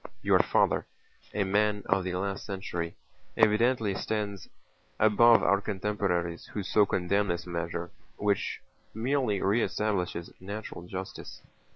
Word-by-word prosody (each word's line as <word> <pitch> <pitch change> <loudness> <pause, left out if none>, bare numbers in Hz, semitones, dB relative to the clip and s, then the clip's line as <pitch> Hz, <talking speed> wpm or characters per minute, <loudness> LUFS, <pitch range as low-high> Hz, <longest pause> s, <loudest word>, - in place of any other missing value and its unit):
"Your - - +5
father, - - +2 0.4
a 105 - 0
man 105 +1 +1
of 95 -1 +2
the 90 0 -3
last 95 +1 -2
century, 85 -4 -4 0.4
evidently 110 0 +3
stands 100 0 -3 0.5
above 115 +2 +6
our 100 +2 +3
contemporaries 95 -4 -2
who 105 - -4
so 105 +2 +3
condemn 100 +3 +1
this 85 -1 -2
measure 85 0 -4 0.3
which 100 -1 -1 0.3
merely 120 -3 0
re 105 +5 +3
establishes 90 -7 -1
natural 100 -2 -7
justice." 95 +1 -7
100 Hz, 125 wpm, -29 LUFS, 90-105 Hz, 0.5 s, above